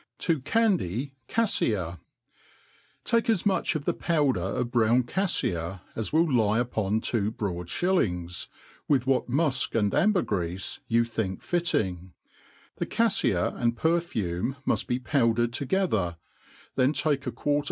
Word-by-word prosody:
To 165 -4 +2
candy 145 - 0 0.2
CaJJia. 105 - +1
V - - -27 1.0
TAKE 230 0 +1
as 215 -5 +2
much 195 -4 +1
of 145 -2 -3
the - - +1
powder 145 - +1
of 120 +6 -2
brown 120 +1 +3
caflia 95 - -1
as 110 - -3
will 160 +2 +4
lie 115 -5 +2
uppn 110 -3 -1
two 105 -3 0
broad 90 -6 -4
(hillings, 90 - 0 0.4
with 135 -4 +2
what 130 -1 +1
mufkan,d 130 -7 +1
ambergreafe 95 - 0
you 115 0 +3
think 110 -5 -3
fitting; 95 - -1 0.6
the - - -2
caifia 205 - +1
and 120 0 +1
perfume 135 - 0
muft - - +1
be 125 - 0
powdered 120 -2 +1
toge 185 +10 0
ther, 90 -5 0 0.6
then 130 +3 +2
take 145 -3 0
a - - -1
quarter. 145 0 0
120 Hz, 135 wpm, -27 LUFS, 100-160 Hz, 1.0 s, will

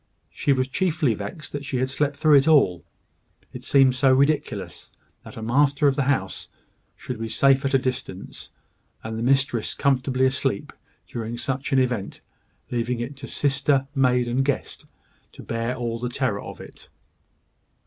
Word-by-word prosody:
She 145 - 0
was 130 -1 +2
chiefly 155 -4 +1
vexed 105 +9 -7
that 145 0 -5
she 135 -2 -3
had 130 +1 +1
slept 145 +2 -1
through 155 -1 +4
it 140 +2 +3
all. 95 - +4 0.7
It - - -8
seemed 135 -2 +4
so 130 +1 +3
ridiculous 140 +3 0 0.3
that - - -12
the 110 - -7
master 140 +4 +3
of 135 - +3
the 140 -2 0
house 95 -9 -1 0.5
should 125 -3 -7
be 115 0 -4
safe 135 +3 +3
at 135 0 +1
a - - +7
distance, 130 -7 -5 0.5
and 110 0 -5
the 110 - -4
mistress 130 -2 +1
comfortably 130 -1 +1
asleep, 130 -5 -1 0.3
during 115 0 -5
such 130 +3 -3
an 135 - +3
event, 125 -6 -1 0.5
leaving 120 0 -1
it 125 +4 -5
to 135 0 -8
sister, 135 -1 +1
maid, 125 -3 +2
and 125 +3 +1
guest, 140 0 -3 0.5
to - - -11
bear 115 +2 -2
all 115 -2 -3
the 125 +1 -3
terror 120 -5 -1
of - - -9
it! - - -13
130 Hz, 170 wpm, -24 LUFS, 120-140 Hz, 0.7 s, a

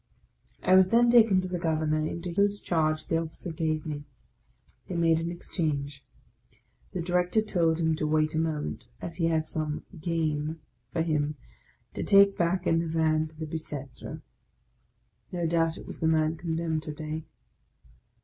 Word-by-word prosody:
I 185 - +4
was 190 0 +7
then 235 +3 +4
taken 220 -6 +6
to 185 - -3
the 180 -1 -3
Governor, 155 -2 0
into 170 +2 -4
whose 200 +3 +2
charge 155 -4 0
the 165 - +1
Officer 165 +1 -4
gave 155 -1 -1
me. 150 -2 -4 0.8
They 180 - -5
made 165 -1 +3
an 165 +1 -2
exchange. 145 -5 -3 0.9
The 180 - -2
Director 180 +4 +2
told 170 -6 +1
him 160 -1 +2
to 155 - -1
wait 155 0 +2
a 160 - +1
moment, 160 -2 -2
as 170 - -3
he 165 - +1
had 160 -1 +1
some 155 -1 -3
" 175 -5 -12
game 160 -2 -1 0.2
" 120 -1 -45
for 165 - 0
him 150 -2 0 0.6
to - - -4
take 200 -1 +6
back 175 +1 0
in 165 -1 +3
the 165 - -1
Van 160 -1 +1
to 155 - -18
the 160 +1 -5
Bicetre. 150 -4 -5 1.1
No 175 -2 -2
doubt 165 0 +1
it - - -10
was - - -8
the 160 - +1
man 160 0 +2
condemned 160 -1 -2
to 155 -1 -6
day. 155 +1 -5
160 Hz, 175 wpm, -28 LUFS, 155-175 Hz, 1.1 s, was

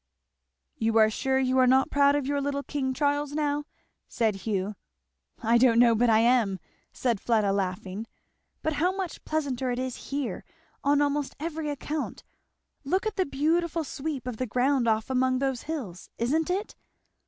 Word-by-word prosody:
"You 225 -2 +1
are 215 -1 +6
sure 265 +4 0
you 260 0 +2
are 255 - +5
not 265 +1 +4
proud 285 0 +4
of 290 -2 0
your 285 +1 0
little 280 0 -2
King 275 -3 -2
Charles 285 +2 0
now?" 295 -1 -1 0.4
said 225 -2 +1
Hugh. 195 0 -2 0.7
"I 230 +1 +4
don't 235 -2 +5
know 235 -1 +6
but 235 +2 +3
I 220 - +5
am," 230 -5 +3 0.3
said 235 -6 -1
Fleda 215 -4 +2
laughing. 190 +2 -3 0.6
"But 315 - 0
how 345 +5 +2
much 380 -3 -5
pleasanter 275 -5 -1
it 245 - -1
is 255 -1 -5
here 280 -2 -3 0.4
on 285 +1 +3
almost 285 -1 -1
every 320 -1 -3
account. 295 +1 -4 0.6
Look 370 +9 0
at 435 -1 -2
the 375 - +1
beautiful 325 +4 0
sweep 280 -2 -5
of 250 -3 -4
the 255 - -2
ground 250 +2 +1
off 220 +2 +1
among 255 0 +2
those 265 -2 -1
hills 230 - -5
isn't 300 +8 0
it? 390 +4 -2
265 Hz, 170 wpm, -27 LUFS, 235-290 Hz, 0.7 s, are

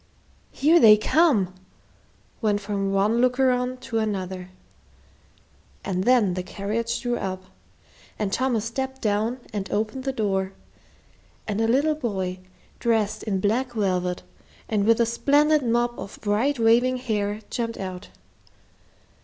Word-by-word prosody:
"Here 315 +5 +4
they 215 -6 +8
come!" 215 - +2 0.9
went 210 -2 +1
from 200 -1 -2
one 205 +4 +2
looker 255 +1 +3
on 250 +1 -1
to 235 -3 -2
another. 190 -4 -3 1.4
And 185 -1 -1
then 240 -7 +4
the 185 - -2
carriage 215 +5 -3
drew 245 -1 -1
up, 185 -1 -4 0.7
and 200 -2 -2
Thomas 245 -4 0
stepped 265 +3 -4
down 220 +3 -1
and 195 -2 -3
opened 215 +5 -2
the 270 - 0
door, 195 -5 -1 0.9
and 210 0 -1
a 225 - +2
little 280 +7 +3
boy, 190 -10 -3 0.4
dressed 220 -2 0
in 200 -3 -1
black 240 +5 0
velvet, 180 -4 -1 0.4
and 210 -2 0
with 230 +1 +4
a 235 - +4
splendid 290 +6 +3
mop 240 0 0
of 195 +1 -8
bright 225 +7 +1
waving 240 +3 +3
hair, 210 -3 -2
jumped 230 -2 -3
out. 185 0 -6
220 Hz, 135 wpm, -24 LUFS, 200-250 Hz, 1.4 s, they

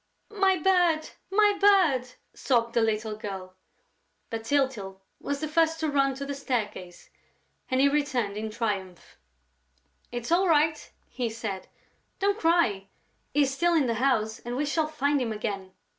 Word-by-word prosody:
"My 385 -2 +3
bird! 345 -2 +2 0.2
My 415 +1 +4
bird!" 320 -12 +4 0.2
sobbed 235 -3 0
the 235 - +3
little 220 -1 0
girl. 190 -3 -7 0.8
But 225 0 -4
Tyltyl 230 -8 -1 0.2
was 285 0 -3
the 310 - -1
first 325 +1 +2
to 310 -2 0
run 275 -1 +2
to 280 +1 -5
the 280 - -4
staircase 215 -10 -4 0.6
and 255 - +1
he 275 - +5
returned 265 -8 0
in 220 +1 -4
triumph: 200 -5 -4 0.9
"It's 240 +3 -5
all 370 +3 +4
right!" 310 -1 +2 0.2
he 245 -3 -3
said. 220 -4 -5 0.5
"Don't 405 +2 0
cry! 325 - +2 0.4
He 290 +1 +3
is 270 -1 -1
still 345 +5 +2
in 305 -4 +3
the 235 - 0
house 220 -5 +1
and 240 +1 -5
we 290 +3 0
shall 310 +1 0
find 290 -2 0
him 235 -3 -1
again." 200 -3 -4
265 Hz, 160 wpm, -27 LUFS, 220-310 Hz, 0.9 s, he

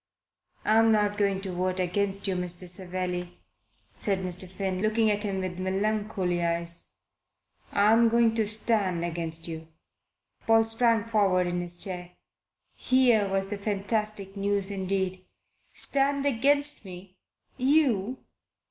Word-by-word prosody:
"I 220 +1 +4
am 225 0 +4
not 210 -1 +2
going 200 -2 +1
to 190 -2 -5
vote 185 +1 -2
against 195 +2 -1
you, 190 - -1
Mr. 180 0 -1
Savelli," 180 -1 -1 0.6
said 195 -2 -1
Mr. 180 0 -2
Finn, 190 0 -3
looking 215 0 +2
at 205 0 -1
him 200 -2 -3
with 185 -1 -5
melancholy 195 -2 -1
eyes. 170 0 -2 0.8
"I 205 +1 +3
am 230 +1 +5
going 230 -1 +3
to 220 -2 0
stand 205 -5 0
against 165 -1 -3
you." 160 -1 -7 0.8
Paul 225 0 +5
sprang 225 -1 +2
forward 200 -5 +2
in 175 0 -2
his 175 0 -2
chair. 180 -1 -7 0.6
Here 245 -6 +2
was 195 +1 -1
fantastic 205 0 -2
news 200 0 -1
indeed! 190 -1 -2 0.5
"Stand 280 0 +3
against 285 +2 +2
me? 185 -1 -11 0.4
You? 260 -5 +2
195 Hz, 130 wpm, -27 LUFS, 180-220 Hz, 0.8 s, am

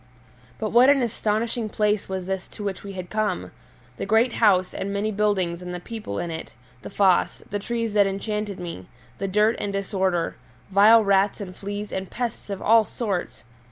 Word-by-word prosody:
But 215 -1 -3
what 245 +3 +7
an 280 -2 +4
astonishing 225 0 -1
place 210 -1 0
was 190 -1 -3
this 190 -1 -3
to 210 - -6
which 195 -3 -4
we 200 -1 -7
had 185 -2 -7
come! 215 -4 -1 0.5
The - - -4
great 225 +3 +3
house 185 -5 +3
and 200 - -3
many 205 +2 -1
buildings 195 -5 0
and 180 0 -5
the - - -4
people 210 - -6
in 170 - -3
it, 160 0 -7 0.3
the - - -8
foss, 190 -3 +2
the 205 - -1
trees 230 0 -2
that 205 -1 +5
enchanted 205 0 -3
me, 170 - -7 0.3
the 195 - -1
dirt 210 +4 +3
and 205 - -2
disorder, 190 -3 -1 0.3
vile 215 +3 +7
rats 200 +1 +2
and 185 -3 -7
fleas 205 +1 -5
and 190 0 -4
pests 235 -3 -4
of 200 -1 -4
all 225 +1 +6
sorts! 205 -5 -4
200 Hz, 190 wpm, -24 LUFS, 190-215 Hz, 0.5 s, what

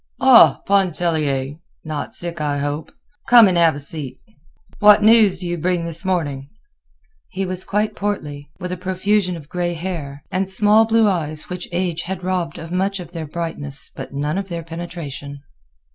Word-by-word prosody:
"Ah, 260 -3 +7
Pontellier! 155 -8 0 0.3
Not 155 -1 -4
sick, 170 -2 -3
I 145 -1 -1
hope. 145 +2 -3 0.4
Come 235 -3 +8
and 185 - +1
have 165 -3 +4
a - - -6
seat. 140 -2 -6 0.6
What 210 0 +7
news 215 -4 +6
do 180 0 -6
you 175 -1 -3
bring 175 0 0
this 170 +2 -5
morning?" 145 -8 -2 0.8
He 195 +1 -3
was 185 0 -4
quite 210 +1 -1
portly, 150 -9 -4
with 180 -1 -5
a 180 - -3
profusion 185 0 0
of 150 -3 -12
gray 175 +1 -2
hair, 160 -5 -6
and 190 +1 -1
small 210 +3 +4
blue 225 -1 +3
eyes 155 -5 -2
which 180 0 -6
age 175 -2 -1
had 185 0 -5
robbed 180 -3 -2
of 165 +1 -8
much 195 +2 -1
of 175 -2 -9
their 165 -3 -6
brightness 145 -3 -4
but - - -7
none 145 +6 -2
of 195 -1 -6
their 170 -1 -4
penetration. 160 -4 -7
175 Hz, 175 wpm, -20 LUFS, 150-190 Hz, 0.8 s, Come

